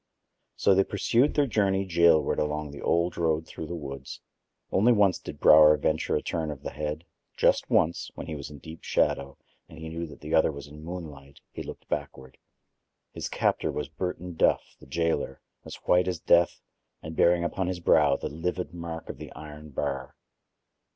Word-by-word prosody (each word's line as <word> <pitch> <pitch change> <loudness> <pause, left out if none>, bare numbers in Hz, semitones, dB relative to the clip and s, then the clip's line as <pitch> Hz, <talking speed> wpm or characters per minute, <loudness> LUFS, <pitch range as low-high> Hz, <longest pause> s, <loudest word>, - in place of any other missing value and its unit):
So 100 - +4
they 95 +1 +4
pursued 115 +8 +1
their 145 - +4
journey 100 -5 +1
jailward 85 -3 +4
along 75 -1 -2
the 70 - -9
old 85 +1 +1
road 80 -1 +1
through 80 - -7
the 85 - -5
woods. 70 -4 -7 0.5
Only 110 +6 +4
once 100 -5 +3
did - - -9
Brower 75 0 +8
venture 80 +2 0
a - - -1
turn 80 -2 -2
of 75 -3 -7
the - - -4
head: 75 +1 -4 0.3
just - - +3
once, 85 +2 +2
when - - -6
he 80 - -5
was 70 -2 -6
in 75 - -10
deep 80 +3 -11
shadow 70 0 0 0.3
and 80 - -13
he 80 0 -7
knew 85 +1 -4
that 75 - -13
the 75 +1 -5
other 80 - +4
was 70 -1 -8
in 75 +1 -12
moonlight, 75 -5 -8
he - - -7
looked - - -9
backward. 65 -3 -5 0.7
His - - -5
captor - - 0
was - - -4
Burton 90 -1 -4
Duff, - - +1
the - - -15
jailer, 80 -2 -1 0.3
as - - -7
white 90 +1 +4
as 90 -2 -1
death 85 +1 +3 0.4
and 80 +1 -7
bearing 85 +1 +4
upon 90 +2 -1
his 90 -1 -2
brow 75 -4 +4
the - - -4
livid 85 +1 -3
mark 85 -1 -6
of - - -7
the - - -9
iron 75 0 -10
bar. 65 -1 -4
80 Hz, 190 wpm, -27 LUFS, 75-90 Hz, 0.7 s, Brower